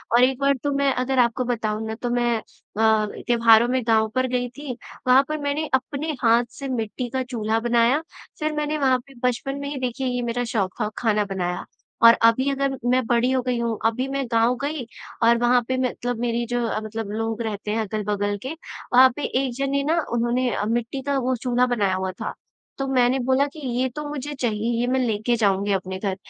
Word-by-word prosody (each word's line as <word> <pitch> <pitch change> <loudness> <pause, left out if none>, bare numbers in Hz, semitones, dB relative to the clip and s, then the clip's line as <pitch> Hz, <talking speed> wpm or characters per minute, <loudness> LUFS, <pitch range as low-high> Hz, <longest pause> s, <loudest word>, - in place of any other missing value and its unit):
और 245 - +6
एक 260 0 +2
बार 280 0 +3
तो 290 - 0
मैं 280 0 +2
अगर 255 +1 0
आपको 240 +1 +2
बताऊँ 220 -3 -2
ना, 220 - -4
तो 245 +2 -4
मैं 240 -1 +1 0.4
अ, - - +1 0.5
त्योहारों 230 -1 +5
में 255 0 +1
गाँव 220 -1 +4
पर 255 0 +2
गई 245 0 -1
थी, 285 +2 -7 0.4
वहाँ 255 +2 +6
पर 305 - -1
मैंने 285 +2 -1
अपने 285 +4 -1
हाथ 235 0 +4
से 275 +2 -7
मिट्टी 245 0 -3
का 260 +2 -2
चूल्हा 225 -3 -1
बनाया। 240 +4 +2 0.4
फिर 310 0 0
मैंने 300 0 -1
वहाँ 265 -3 +3
पे 275 - -15
बचपन 270 +3 -2
में 280 - -5
ही 290 - -5
देखिए 255 +1 -2
ये 245 -1 -1
मेरा 240 0 -1
शौक 195 -5 -1
ख 210 - 0
खाना 215 -3 +1
बनाया। 180 -3 -3 0.4
और 230 - +9 0.2
अभी 260 +4 0
अगर 275 -1 -1
मैं 255 0 +2
बड़ी 240 +1 +2
हो 260 - +2
गई 250 -1 -1
हूँ, 230 -2 -1
अभी 240 +4 +1
मैं 275 0 -2
गाँव 230 +2 +3
गई 290 -3 -3 0.4
और 235 +1 +5
वहाँ 245 +1 +4
पर 260 0 0
मतलब 245 -1 -4
मेरी 235 0 -1
जो 245 +1 -2 0.3
मतलब 215 -1 -5
लोग 225 +1 -2
रहते 210 -2 -3
हैं 225 +1 0
अगल-बगल 205 -1 -2
के, 265 +4 -4 0.4
वहाँ 260 +1 +8
पे 295 - -5 0.2
एक 250 - -3
जने 275 0 0
ना 320 +4 +1
उन्होंने 240 +2 +1
अ, - - -1
मिट्टी 235 +4 -2
का 280 +1 -1
वो 255 0 0
चूल्हा 245 +1 +1
बनाया 205 -6 +1
हुआ 190 0 -2
था। 185 - -6 0.4
तो 275 - -2
मैंने 255 -1 +3
बोला 265 +2 +3
कि 315 - -10 0.2
ये 260 - +2
तो 300 0 -4
मुझे 295 0 -5
चाहिए, 230 -4 -1
ये 240 - +1
मैं 260 +1 +1
लेके 235 -1 0
जाऊँगी 200 -2 +1
अपने 190 0 -3
घर। 195 -1 -2
245 Hz, 215 wpm, -23 LUFS, 225-265 Hz, 0.5 s, और